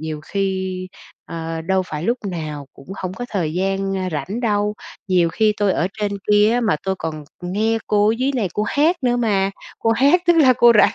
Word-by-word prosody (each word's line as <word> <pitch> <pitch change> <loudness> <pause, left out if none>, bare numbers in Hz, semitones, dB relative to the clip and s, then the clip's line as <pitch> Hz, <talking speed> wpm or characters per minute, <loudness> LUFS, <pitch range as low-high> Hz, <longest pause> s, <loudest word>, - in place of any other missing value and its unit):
nhiều 155 -1 -5
khi, 190 +1 -3 0.4
ờ, 165 0 -5
đâu 190 +2 +1
phải 150 -2 -5
lúc 235 +5 +1
nào 155 -5 -5
cũng 135 - -17
hổng 185 -1 -3
có 245 - -5
thời 170 -7 -1
gian, 195 +1 -1
ơ, 190 - -2
rảnh 170 - -3
đâu. 210 -3 0 0.3
Nhiều 180 -3 +3
khi 215 +4 +2
tôi 205 -2 +2
ở 175 - 0
trên 205 -1 0 0.2
kia 210 +1 +5
á 245 - +2
mà 215 -9 +1
tôi 190 0 0
còn 155 -2 -5 0.2
nghe 215 +5 0
cô 210 0 +3
ở 220 - +3
dưới 265 +2 +1
này 215 -6 0
cô 210 - 0
hát 300 +10 +2
nữa 245 -1 +2
mà, 200 -5 +1 0.3
cô 225 - +1
hát 280 +10 +4
tức 345 -1 +5
là 270 -6 +6
cô 240 0 +6
rảnh.". - - +5
195 Hz, 220 wpm, -20 LUFS, 175-225 Hz, 0.4 s, là